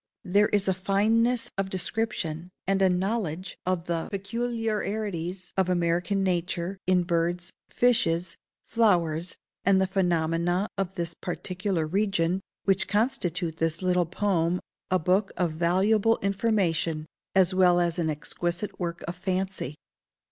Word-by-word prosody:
There 205 Hz, +3 st, +3 dB
is 205 Hz, -1 st, +2 dB
a 190 Hz, -, +3 dB
fineness 220 Hz, +6 st, +1 dB
of 195 Hz, -1 st, 0 dB
description, 185 Hz, -4 st, -1 dB, 0.2 s
and 195 Hz, +1 st, +1 dB
a 190 Hz, -, +5 dB
knowledge 185 Hz, -2 st, -2 dB
of 180 Hz, -2 st, 0 dB
the 170 Hz, -2 st, -2 dB
peculiarities 205 Hz, -4 st, -3 dB
of 190 Hz, -2 st, +1 dB
American 175 Hz, +3 st, +1 dB
nature, 180 Hz, +1 st, -1 dB
in 185 Hz, -1 st, +4 dB
birds, 175 Hz, +1 st, -1 dB, 0.2 s
fishes, 180 Hz, -8 st, +2 dB, 0.3 s
flowers, 175 Hz, -7 st, +2 dB, 0.3 s
and 190 Hz, 0 st, +4 dB
the 190 Hz, -, +3 dB
phenomena 175 Hz, 0 st, +1 dB
of 195 Hz, -1 st, -3 dB
this 170 Hz, -2 st, -2 dB
particular 185 Hz, 0 st, -2 dB
region, 185 Hz, 0 st, +1 dB, 0.2 s
which 195 Hz, -1 st, +2 dB
constitute 180 Hz, -, 0 dB
this 165 Hz, +2 st, -1 dB
little 180 Hz, -2 st, +2 dB
poem 180 Hz, -2 st, +1 dB, 0.3 s
a 185 Hz, -, +3 dB
book 185 Hz, +4 st, +1 dB
of 175 Hz, -3 st, +1 dB
valuable 195 Hz, +7 st, +3 dB
information 185 Hz, -6 st, +1 dB, 0.3 s
as 190 Hz, -1 st, +5 dB
well 180 Hz, -1 st, +5 dB
as 175 Hz, 0 st, 0 dB
an 160 Hz, -2 st, +1 dB
exquisite 175 Hz, +5 st, -3 dB
work 170 Hz, -2 st, -3 dB
of 170 Hz, -, -4 dB
fancy. 185 Hz, -5 st, -2 dB
185 Hz, 130 wpm, -27 LUFS, 170-195 Hz, 0.3 s, a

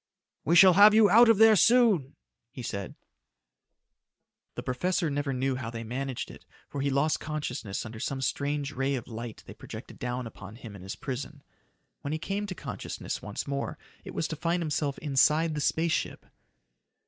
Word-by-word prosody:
"We 165 Hz, +6 st, +2 dB
shall 185 Hz, +1 st, +9 dB
have 205 Hz, +3 st, +8 dB
you 215 Hz, -3 st, +6 dB
out 230 Hz, +3 st, +7 dB
of 225 Hz, -, +5 dB
there 220 Hz, 0 st, +7 dB
soon," 210 Hz, -, +4 dB, 0.3 s
he 125 Hz, -, -9 dB
said. 100 Hz, -4 st, -5 dB, 1.6 s
The -, -, -5 dB
professor 165 Hz, +5 st, -1 dB
never 145 Hz, 0 st, -1 dB
knew 130 Hz, 0 st, -1 dB
how 125 Hz, -3 st, -5 dB
they 115 Hz, 0 st, -6 dB
managed 130 Hz, +2 st, -4 dB
it -, -, -14 dB, 0.2 s
for 140 Hz, -, -5 dB
he 140 Hz, -, +1 dB
lost 140 Hz, +3 st, +1 dB
consciousness 125 Hz, -10 st, -4 dB
under 110 Hz, 0 st, -8 dB
some 135 Hz, +3 st, -3 dB
strange 140 Hz, +2 st, -2 dB
ray 135 Hz, -1 st, -1 dB
of 125 Hz, -2 st, -6 dB
light 115 Hz, -1 st, -7 dB
they -, -, -10 dB
projected -, -, -10 dB
down 125 Hz, 0 st, -3 dB
upon 105 Hz, -2 st, -10 dB
him 115 Hz, -4 st, -10 dB
in 95 Hz, -, -11 dB
his 95 Hz, +2 st, -6 dB
prison. 135 Hz, +2 st, -6 dB, 0.6 s
When 140 Hz, -, -3 dB
he -, -, 0 dB
came 200 Hz, +5 st, -3 dB
to 185 Hz, -, -5 dB
consciousness -, -, -6 dB
once 105 Hz, +6 st, -5 dB
more, 140 Hz, 0 st, -3 dB, 0.3 s
it -, -, -9 dB
was 160 Hz, -, -1 dB
to 160 Hz, -, -3 dB
find 170 Hz, +3 st, -1 dB
himself 145 Hz, -2 st, -1 dB
inside 150 Hz, +3 st, +2 dB
the 150 Hz, -, -3 dB
space 165 Hz, +3 st, +1 dB
ship. -, -, -3 dB
140 Hz, 185 wpm, -28 LUFS, 125-165 Hz, 1.6 s, shall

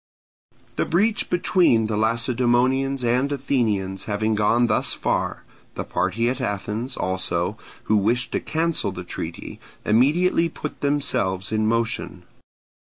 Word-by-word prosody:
The -, -, +1 dB
breach 210 Hz, +6 st, +1 dB
between 175 Hz, -10 st, +3 dB
the 110 Hz, 0 st, -2 dB
Lacedaemonians 125 Hz, +4 st, +2 dB
and 125 Hz, +4 st, +1 dB
Athenians 110 Hz, -9 st, -1 dB
having 110 Hz, +1 st, 0 dB
gone 110 Hz, +3 st, +3 dB
thus 115 Hz, -, +1 dB
far, -, -, -1 dB, 0.3 s
the -, -, -3 dB
party 95 Hz, +6 st, -1 dB
at 130 Hz, +2 st, -1 dB
Athens, 110 Hz, +3 st, -3 dB
also, 95 Hz, -2 st, -1 dB, 0.3 s
who 110 Hz, -, +2 dB
wished 115 Hz, +5 st, 0 dB
to -, -, 0 dB
cancel 160 Hz, -10 st, -1 dB
the 90 Hz, -1 st, -7 dB
treaty, 85 Hz, -1 st, -6 dB, 0.3 s
immediately 165 Hz, +9 st, +3 dB
put 150 Hz, -1 st, -7 dB
themselves 125 Hz, -10 st, 0 dB
in 110 Hz, 0 st, +1 dB
motion. 115 Hz, 0 st, -1 dB
115 Hz, 125 wpm, -23 LUFS, 105-135 Hz, 0.3 s, between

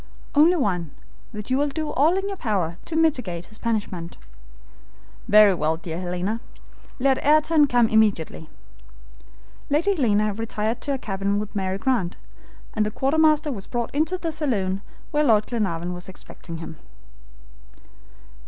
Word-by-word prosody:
"Only 315 Hz, +5 st, +6 dB
one; 180 Hz, -, -1 dB, 0.4 s
that 210 Hz, +2 st, -7 dB
you 260 Hz, -, +3 dB
will 290 Hz, -, +2 dB
do 310 Hz, +2 st, -3 dB
all 315 Hz, +7 st, +3 dB
in 390 Hz, +1 st, -2 dB
your 400 Hz, -, -3 dB
power 185 Hz, -, -1 dB
to 325 Hz, -, -5 dB
mitigate 250 Hz, -, 0 dB
his 215 Hz, -, -10 dB
punishment." 205 Hz, -7 st, -3 dB, 1.1 s
"Very 210 Hz, -1 st, +7 dB
well, 160 Hz, -2 st, 0 dB
dear 165 Hz, 0 st, -6 dB
Helena. 180 Hz, +5 st, -2 dB, 0.6 s
Let 265 Hz, 0 st, +1 dB
Ayrton 305 Hz, 0 st, +4 dB
come 245 Hz, -3 st, +3 dB
immediately." 205 Hz, -8 st, +1 dB, 1.2 s
Lady 335 Hz, +8 st, +2 dB
Helena 215 Hz, -, +2 dB
retired 225 Hz, +1 st, -2 dB
to 285 Hz, -, -2 dB
her -, -, -1 dB
cabin 200 Hz, -4 st, -2 dB
with 210 Hz, +1 st, -4 dB
Mary 190 Hz, -1 st, -1 dB
Grant, 200 Hz, -6 st, 0 dB, 0.6 s
and 215 Hz, -, +1 dB
the 210 Hz, -, 0 dB
quartermaster 305 Hz, +5 st, +2 dB
was 200 Hz, -7 st, -6 dB
brought 240 Hz, -1 st, -3 dB
into 310 Hz, +5 st, +1 dB
the 335 Hz, -2 st, -3 dB
saloon 205 Hz, -12 st, -1 dB, 0.3 s
where 300 Hz, 0 st, +2 dB
Lord 215 Hz, -6 st, +4 dB
Glenarvan 180 Hz, -7 st, -2 dB
was 180 Hz, +1 st, -6 dB
expecting 170 Hz, -2 st, -9 dB
him. 160 Hz, -1 st, -8 dB
220 Hz, 145 wpm, -24 LUFS, 190-290 Hz, 1.2 s, Very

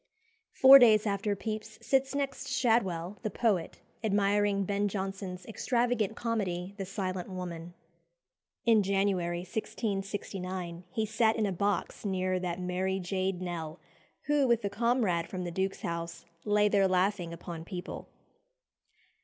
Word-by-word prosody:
Four 270 Hz, +1 st, +9 dB
days 220 Hz, -4 st, +6 dB
after 205 Hz, 0 st, 0 dB
Pepys 215 Hz, +1 st, -5 dB
sits 270 Hz, +3 st, +1 dB
next 275 Hz, -1 st, -2 dB
Shadwell, 210 Hz, -8 st, +1 dB
the 215 Hz, -, -2 dB
poet, 200 Hz, -5 st, 0 dB, 0.2 s
admiring 205 Hz, -1 st, +2 dB
Ben 200 Hz, +1 st, 0 dB
Jonson's 190 Hz, -2 st, -4 dB
extravagant 235 Hz, -1 st, 0 dB
comedy, 195 Hz, -6 st, -2 dB
"The 195 Hz, -2 st, -4 dB
Silent 185 Hz, -2 st, -3 dB
Woman." 175 Hz, -2 st, -6 dB, 0.9 s
In 225 Hz, -2 st, +5 dB
January 190 Hz, -3 st, 0 dB
1669 190 Hz, -3 st, -4 dB
he 220 Hz, +4 st, -1 dB
sat 220 Hz, +1 st, +2 dB
in 220 Hz, -, +1 dB
a 200 Hz, -, 0 dB
box 200 Hz, 0 st, -1 dB
near 185 Hz, -2 st, 0 dB
"that 180 Hz, -1 st, -3 dB
merry 185 Hz, +1 st, -1 dB
jade 185 Hz, 0 st, -2 dB
Nell," 165 Hz, -2 st, -5 dB, 0.4 s
who, 290 Hz, -2 st, +2 dB
with 235 Hz, -3 st, +2 dB
a 200 Hz, -, -1 dB
comrade 215 Hz, -6 st, +1 dB
from 185 Hz, -1 st, -5 dB
the 175 Hz, -, -4 dB
Duke's 190 Hz, +3 st, -2 dB
House, 170 Hz, 0 st, -4 dB, 0.2 s
"lay 210 Hz, 0 st, +4 dB
there 200 Hz, -2 st, +3 dB
laughing 185 Hz, -1 st, +1 dB
upon 170 Hz, -1 st, -7 dB
people." 180 Hz, 0 st, -7 dB
195 Hz, 135 wpm, -30 LUFS, 180-215 Hz, 0.9 s, Four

